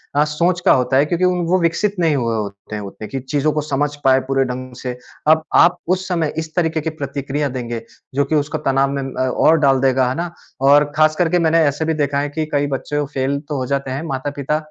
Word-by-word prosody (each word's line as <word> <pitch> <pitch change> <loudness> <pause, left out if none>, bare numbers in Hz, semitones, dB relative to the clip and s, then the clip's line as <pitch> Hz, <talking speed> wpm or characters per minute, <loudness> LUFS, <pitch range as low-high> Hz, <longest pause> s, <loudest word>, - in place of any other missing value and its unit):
अ, 145 - +5
सोच 170 +4 0
का - - +6
होता 130 +1 +2
है, 140 - +4
क्योंकि 175 +3 0 0.3
वो 185 - +4
विकसित 185 +5 +1
नहीं 160 -3 +2
हुए 115 -4 0
होते 100 0 -5
हैं 105 - -4
उतने 100 +2 -8
की 135 - -4
चीज़ों 145 +3 0
को 150 - 0
समझ 145 0 -1
पाएँ 130 0 +5
पूरे 135 0 +2
ढंग 130 0 -6
से। 125 -1 -4 0.3
अब 155 0 +5
आप 175 +1 +6 0.2
उस 185 0 -7
समय 165 -4 -1
इस 160 0 -4
तरीके 160 -2 +1
की 160 - -2
प्रतिक्रिया 140 -1 -3
देंगे, 120 -2 -4 0.3
जो 140 0 +2
कि 155 +3 -1
उसका 150 +1 -1
तनाव 135 +1 +2
में 140 -1 -2
अ, 130 -1 -2
और 160 +5 +4
डाल 135 -3 +3
देगा, 130 -1 +2
है 130 - -2
ना? 170 0 -3 0.3
और 145 +1 +5
ख़ास 155 0 +4
करके 175 +1 +2
मैंने 165 0 +3
ऐसे 145 +3 -1
भी 160 - +1
देखा 140 0 0
है 145 0 -1
कि 155 +2 -2
कई 145 0 +2
वो 140 - -1
बच्चे 145 +2 -2
फेल 135 +1 0
तो 145 - -2
हो 130 - -2
जाते 135 -1 -4
हैं, 135 - -3
माता-पिता 140 +2 -2
145 Hz, 240 wpm, -19 LUFS, 130-155 Hz, 0.3 s, का